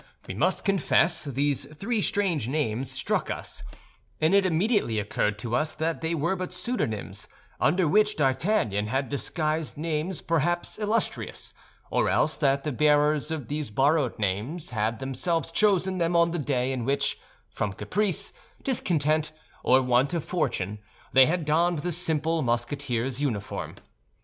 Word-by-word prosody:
We -, -, -4 dB
must -, -, 0 dB
confess 175 Hz, -4 st, +2 dB
these 140 Hz, 0 st, 0 dB
three 215 Hz, +6 st, -1 dB
strange 180 Hz, -, 0 dB
names 130 Hz, -3 st, -1 dB
struck 130 Hz, +1 st, -1 dB
us; -, -, -6 dB, 0.6 s
and 160 Hz, +4 st, +3 dB
it 200 Hz, -1 st, +5 dB
immediately 180 Hz, -, +1 dB
occurred 105 Hz, 0 st, -1 dB
to 115 Hz, +2 st, -2 dB
us 155 Hz, +3 st, 0 dB
that 160 Hz, +1 st, -2 dB
they 165 Hz, +1 st, -1 dB
were 165 Hz, +5 st, 0 dB
but 185 Hz, -1 st, -5 dB
pseudonyms, 105 Hz, -, -3 dB, 0.3 s
under 175 Hz, +2 st, +3 dB
which 210 Hz, +5 st, +3 dB
D'Artagnan 130 Hz, -, +1 dB
had 135 Hz, +4 st, -1 dB
disguised 155 Hz, +2 st, -1 dB
names 160 Hz, +3 st, -2 dB
perhaps 170 Hz, +4 st, 0 dB
illustrious, 215 Hz, +2 st, -1 dB, 0.4 s
or -, -, +2 dB
else 155 Hz, -, +2 dB
that 140 Hz, -2 st, +2 dB
the 150 Hz, -, -2 dB
bearers 150 Hz, +2 st, +3 dB
of 155 Hz, -7 st, -4 dB
these 150 Hz, -1 st, -3 dB
borrowed 135 Hz, +3 st, +2 dB
names 110 Hz, -, -2 dB
had 110 Hz, 0 st, -1 dB
themselves 135 Hz, +6 st, -1 dB
chosen 190 Hz, -3 st, +2 dB
them 170 Hz, 0 st, +1 dB
on 170 Hz, 0 st, +4 dB
the 175 Hz, -, -2 dB
day 130 Hz, -3 st, 0 dB
in 130 Hz, -3 st, -2 dB
which, 140 Hz, +3 st, 0 dB, 0.3 s
from 105 Hz, -, -2 dB
caprice, 185 Hz, -, -1 dB, 0.3 s
discontent, 155 Hz, -, +1 dB, 0.3 s
or 130 Hz, +1 st, +4 dB
want 125 Hz, +5 st, +2 dB
of 165 Hz, -, -2 dB
fortune, 105 Hz, -, -1 dB, 0.3 s
they 130 Hz, 0 st, +7 dB
had 165 Hz, 0 st, -1 dB
donned 165 Hz, +3 st, +2 dB
the 175 Hz, -, 0 dB
simple 165 Hz, -1 st, 0 dB
Musketeer's 125 Hz, +1 st, -1 dB
uniform. 110 Hz, -8 st, -3 dB
150 Hz, 150 wpm, -26 LUFS, 130-170 Hz, 0.6 s, they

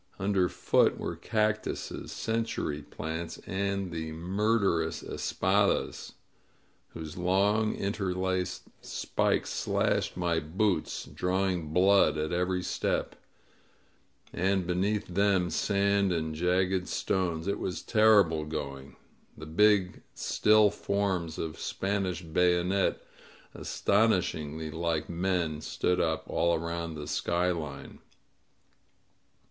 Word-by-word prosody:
Underfoot 95 Hz, -2 st, +2 dB
were -, -, -4 dB
cactuses, 110 Hz, -1 st, -2 dB
century 110 Hz, -10 st, -2 dB
plants, 80 Hz, +3 st, -5 dB
and 100 Hz, -1 st, -2 dB
the 80 Hz, -1 st, -4 dB
murderous 95 Hz, -1 st, 0 dB
espadasy 100 Hz, +2 st, 0 dB, 0.8 s
whose 80 Hz, -1 st, -7 dB
long, 100 Hz, +5 st, +2 dB
interlaced 95 Hz, -2 st, -2 dB, 0.2 s
spikes -, -, -1 dB
slashed -, -, 0 dB
my 85 Hz, -2 st, +1 dB
boots, 90 Hz, +3 st, -1 dB
drawing 90 Hz, -3 st, -1 dB
blood 95 Hz, 0 st, +4 dB
at 75 Hz, +1 st, -2 dB
every 90 Hz, +1 st, 0 dB
step; -, -, -1 dB, 1.2 s
and 95 Hz, +1 st, +1 dB
beneath 95 Hz, +4 st, 0 dB
them 95 Hz, -1 st, +1 dB
sand 100 Hz, +2 st, +2 dB
and 80 Hz, -2 st, -1 dB
jagged 90 Hz, +3 st, +1 dB
stones. 85 Hz, -4 st, -1 dB
It 100 Hz, -, -1 dB
was 90 Hz, -, -4 dB
terrible 105 Hz, -8 st, +4 dB
going. 70 Hz, -3 st, -6 dB, 0.4 s
The 75 Hz, -, -8 dB
big 95 Hz, +2 st, +3 dB
still 105 Hz, -1 st, +4 dB
forms 95 Hz, -5 st, -1 dB
of 80 Hz, -1 st, -4 dB
Spanish 95 Hz, -2 st, -2 dB
bayonet, 90 Hz, +3 st, +1 dB, 0.5 s
astonishingly 80 Hz, -7 st, 0 dB
like 80 Hz, -1 st, -2 dB
men, 85 Hz, -3 st, -1 dB
stood 90 Hz, +3 st, 0 dB
up 80 Hz, -1 st, 0 dB
all 85 Hz, 0 st, +2 dB
around 85 Hz, 0 st, -4 dB
the 75 Hz, -1 st, -6 dB
skyline. 85 Hz, -3 st, -2 dB
90 Hz, 100 wpm, -29 LUFS, 80-100 Hz, 1.2 s, blood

